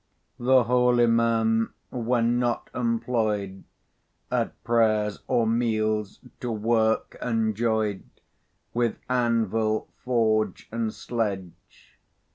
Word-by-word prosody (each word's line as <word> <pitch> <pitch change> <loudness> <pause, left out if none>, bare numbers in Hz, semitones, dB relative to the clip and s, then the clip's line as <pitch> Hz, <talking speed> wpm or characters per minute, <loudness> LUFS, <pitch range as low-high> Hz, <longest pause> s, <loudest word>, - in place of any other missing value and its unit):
The 130 +1 +4
holy 125 +1 +3
man, 115 -1 +2 0.2
when 120 -1 +1
not 120 -1 -1
employed 115 -5 -1 0.7
At - - -2
prayers 110 -3 +2
or 115 - +2
meals, 110 -2 0 0.2
to 125 - -3
work 110 0 +1
enjoyed 110 -3 0 0.7
With 120 -1 0
anvil, 115 -3 0
forge, 110 -5 +1
and 115 -1 -1
sledge. 100 -8 -5
115 Hz, 85 wpm, -26 LUFS, 110-120 Hz, 0.7 s, The